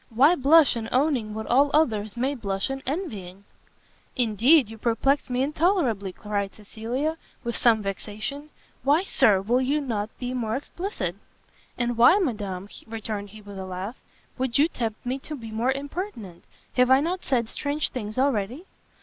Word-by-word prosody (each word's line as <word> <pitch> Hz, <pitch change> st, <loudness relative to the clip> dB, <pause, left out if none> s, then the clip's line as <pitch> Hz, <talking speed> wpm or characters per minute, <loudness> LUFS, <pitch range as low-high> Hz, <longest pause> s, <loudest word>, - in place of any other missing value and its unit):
Why 265 Hz, +8 st, +5 dB
blush 295 Hz, -1 st, +5 dB
in 225 Hz, -1 st, -4 dB
owning 255 Hz, -6 st, +1 dB
what 220 Hz, 0 st, -4 dB
all 275 Hz, +4 st, +4 dB
others 220 Hz, -8 st, +1 dB
may 265 Hz, +4 st, +1 dB
blush 200 Hz, -3 st, -2 dB
in 270 Hz, 0 st, -4 dB
envying?" 205 Hz, -, -4 dB, 0.7 s
"Indeed 245 Hz, +4 st, +4 dB
you 225 Hz, +1 st, -10 dB
perplex 250 Hz, +6 st, +1 dB
me 250 Hz, +1 st, +1 dB
intolerably," 290 Hz, -, +1 dB
cried 200 Hz, 0 st, -3 dB
Cecilia, 235 Hz, +9 st, -3 dB, 0.3 s
with 235 Hz, 0 st, -3 dB
some 225 Hz, -3 st, +3 dB
vexation, 215 Hz, +9 st, -5 dB, 0.3 s
"why 290 Hz, +7 st, +3 dB
Sir, 205 Hz, -, +4 dB
will 240 Hz, +5 st, +2 dB
you 280 Hz, +4 st, +1 dB
not 225 Hz, -7 st, -2 dB
be 250 Hz, 0 st, -4 dB
more 230 Hz, -3 st, -1 dB
explicit?" 270 Hz, -, -4 dB, 0.6 s
"And 240 Hz, -1 st, -1 dB
why, 245 Hz, +11 st, +7 dB
Madam," 205 Hz, -, -2 dB, 0.2 s
returned 215 Hz, -2 st, -5 dB
he, 215 Hz, +1 st, -13 dB
with 200 Hz, -1 st, -9 dB
a 190 Hz, -, -5 dB
laugh, 185 Hz, +6 st, -5 dB, 0.4 s
"would 255 Hz, -2 st, 0 dB
you 295 Hz, +3 st, +5 dB
tempt 230 Hz, -9 st, -4 dB
me 255 Hz, +2 st, -2 dB
to 305 Hz, +3 st, -7 dB
be 225 Hz, -5 st, -8 dB
more 230 Hz, +4 st, +1 dB
impertinent? 275 Hz, -, -6 dB, 0.3 s
have 250 Hz, 0 st, +5 dB
I 260 Hz, +1 st, +7 dB
not 350 Hz, +5 st, -2 dB
said 240 Hz, -4 st, +1 dB
strange 290 Hz, +5 st, -2 dB
things 215 Hz, -4 st, -5 dB
already?" 260 Hz, -, 0 dB
240 Hz, 165 wpm, -25 LUFS, 210-280 Hz, 0.7 s, why